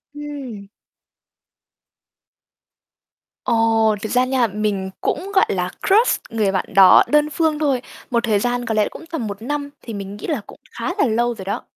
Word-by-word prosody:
Ừm. 275 -9 -7 2.8
Ồ, 225 -2 +2
thật 220 - -4
ra 250 0 +3
nha, 255 -2 +2
mình 205 -2 -2
cũng, 395 +2 -2
gọi 380 - +5
là, 180 -1 -1 0.2
crush 435 +5 +4
người 215 -3 0
bạn 190 - -1
đó 190 -1 +8
đơn 300 0 +3
phương 310 -1 0
thôi. 275 -5 +1 0.3
Một 235 -1 +1
thời 215 -3 +2
gian 245 +2 -1
có 230 - -1
lẽ 215 -1 +2
cũng - - -11
tầm 255 -10 -3
1 200 +1 -7
năm 285 +3 -3
thì 230 - -8
mình 200 0 -6
nghĩ - - -7
là 295 -9 -1
cũng - - -13
khá 350 - -3
là 400 - +3
lâu 240 0 +1
rồi 190 -3 -9
đó. 205 +5 -3
230 Hz, 180 wpm, -20 LUFS, 210-285 Hz, 2.8 s, đó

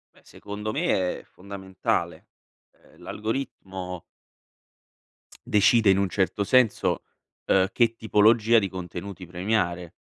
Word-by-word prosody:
Beh, - - -22
secondo 105 +1 -7
me 105 - 0
è - - -16
fondamentale, 95 0 -4 0.4
ehm, - - -24
l'algoritmo 95 -6 -5 1.5
decide 105 0 +4
in 95 - +2
un 100 -2 0
certo 95 +2 0
senso, 125 +1 +2 0.4
uhm, 95 -1 +3
che 115 -2 +2
tipologia 110 +1 +4
di 100 -3 +2
contenuti 90 0 -8
premiare, 90 -2 -2
100 Hz, 105 wpm, -25 LUFS, 95-110 Hz, 1.5 s, decide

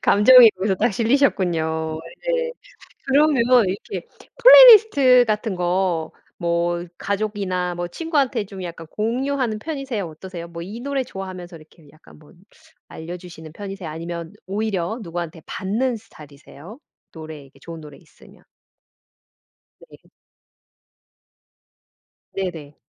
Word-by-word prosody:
감정이 235 +3 +7
거기서 190 0 -2
딱 - - +1
실리셨군요. 175 - 0 0.3
네. 485 -1 -1 0.5
그러면 280 -2 +3 0.3
이렇게 200 - -6 0.3
플레이 - - +10
리스트 280 - +4
같은 215 -1 -2
거 175 -2 -1 0.3
뭐 170 0 -1
가족이나 200 -3 -3
뭐 175 0 -4
친구한테 280 - -1
좀 195 -1 -10
약간 165 -2 -8
공유하는 245 +1 -2
편이세요? 270 - -5
어떠세요? 170 +1 -9
뭐 170 0 -9
이 210 +6 -8
노래 275 +1 -2
좋아하면서 185 -5 -9
이렇게 155 0 -19
약간 155 -1 -19
뭐 150 +2 -20 0.5
알려 170 +2 -8
주시는 165 -3 -12
편이세요? 195 -4 -7
아니면 170 +3 -7
오히려 205 0 -3
누구한테 170 -2 -6
받는 230 +6 -2
스타일이세요? 155 - -14 0.3
노래 155 -2 -10
이렇게 135 - -21
좋은 165 -1 -10
노래 150 -2 -13
있으면. - - -21 1.5
네. - - -15 2.3
네네. 165 -7 -6
190 Hz, 290 characters per minute, -21 LUFS, 170-235 Hz, 2.3 s, 플레이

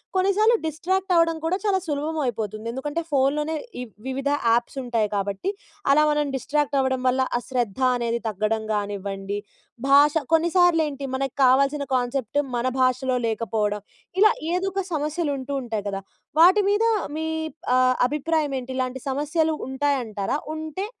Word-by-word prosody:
కొన్నిసార్లు 395 +5 +4
డిస్ట్రాక్ట్ 365 +5 -1
అవ్వడం 330 -1 +3
కూడా 355 +3 +1
చాలా 400 -3 +2
సులభం 305 +2 -2
అయిపోతుంది. 220 -2 -3
ఎందుకంటే 290 +6 -3
ఫోన్‌లోనే 295 +3 +1 0.3
ఈ - - -3 0.2
వివిధ 270 +1 -2 0.2
యాప్స్ 235 +4 +1
ఉంటాయి 230 -3 0
కాబట్టి 200 - -2 0.4
అలా 300 +2 +5
మనం 295 0 +1
డిస్ట్రాక్ట్ 285 +2 0
అవ్వడం 260 -1 0
వల్ల 255 +1 +2 0.2
ఆ - - -1
శ్రద్ధ 245 -2 -2
అనేది 235 -1 -1
తగ్గడం 215 +1 -1
గానివ్వండి, 200 -1 -3 0.5
భాష 285 +1 +6 0.2
కొన్నిసార్లు 340 0 +4
ఏంటి 280 -1 -6
మనకు 270 -1 -2
కావాల్సిన 275 +3 +3
కాన్సెప్ట్ 250 +1 -1 0.2
మన 240 +2 0
భాషలో 255 0 +2
లేకపోవడం 210 -2 -1 0.4
ఇలా 430 +2 +7 0.2
ఏదో 365 +2 0
ఒక 390 0 -1
సమస్యలు 305 +1 -1
ఉంటూ 265 +2 -5
ఉంటాయి 220 -4 -4
కదా! 195 0 -4 0.4
వాటి 375 +5 +7
మీద 410 +2 +2 0.3
మీ 320 - -2 0.5
ఆహ్, 255 0 +4
అభిప్రాయం 300 +1 0
ఏంటి 255 +1 -7
ఇలాంటి 255 0 -2
సమస్యలు 305 +4 0 0.2
ఉంటాయంటారా? 265 -5 -1 0.2
ఉంటే 315 +5 -4
275 Hz, 145 wpm, -24 LUFS, 235-315 Hz, 0.5 s, ఇలా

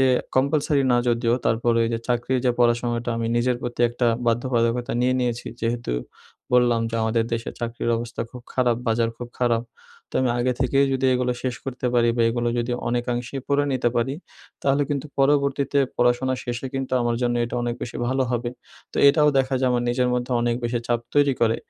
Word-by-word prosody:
যে 130 - +5 0.3
কম্পালসারি 140 +1 +2
না - - +4
যদিও 115 0 +2
তারপর 115 +1 +2
ওই 115 - +1
যে 115 - 0
চাকরির 125 +1 +1
যে 125 - +4
পড়াশোনাটা 120 0 +1
আমি 115 0 -1
নিজের 125 +1 +1
প্রতি 120 0 -4
একটা 120 +1 -1 0.2
বাধ্যবাধকতা 120 0 +1
নিয়ে 125 +1 +2
নিয়েছি। 120 -1 -2
যেহেতু 115 - -2 0.6
বললাম 120 -2 +4
যে, - - -5
আমাদের 110 0 +1
দেশে 115 0 -2
চাকরির 120 0 -2
অবস্থা 115 0 -5
খুব 125 -1 -10
খারাপ 125 -3 +2
বাজার 115 0 +2
খুব 120 -1 -7
খারাপ 120 -1 +2 0.5
তো - - -19
আমি 125 - +2
আগে 125 +1 +1
থেকেই 135 +2 +3
যদি 130 0 +1
এগুলো 125 0 +1
শেষ 125 -2 -1
করতে 130 -1 -4
পারি 120 -1 +4
বা 115 - +3
এগুলো 120 0 -1
যদি 120 +1 -1 0.2
অনেকাংশেই 120 +2 -2
পড়ে 145 0 +2
নিতে 125 -2 +1
পারি। 130 +4 0 0.5
তাহলে 140 +1 +2
কিন্তু 145 0 -2
পরবর্তীতে 140 0 +2 0.2
পড়াশোনা 125 +2 +2
শেষে 120 +1 -4
কিন্তু 135 -1 -3
আমার 120 0 0
জন্য 120 0 +1
এটা 120 - -6
অনেক 120 0 -1
বেশি 120 - -5
ভালো 130 +1 +1
হবে 120 0 -1 0.4
তো - - -8
এটাও 150 +1 +4
দেখা 130 0 +1
যায় 130 - +2
আমার 120 -1 +1
নিজের 125 +1 +1
মধ্যে 125 +1 -2
অনেক 120 0 +1
বেশি 120 0 0
চাপ 120 -1 +1
তৈরি 145 -1 +4
করে 115 0 +3
120 Hz, 195 wpm, -23 LUFS, 120-130 Hz, 0.6 s, যে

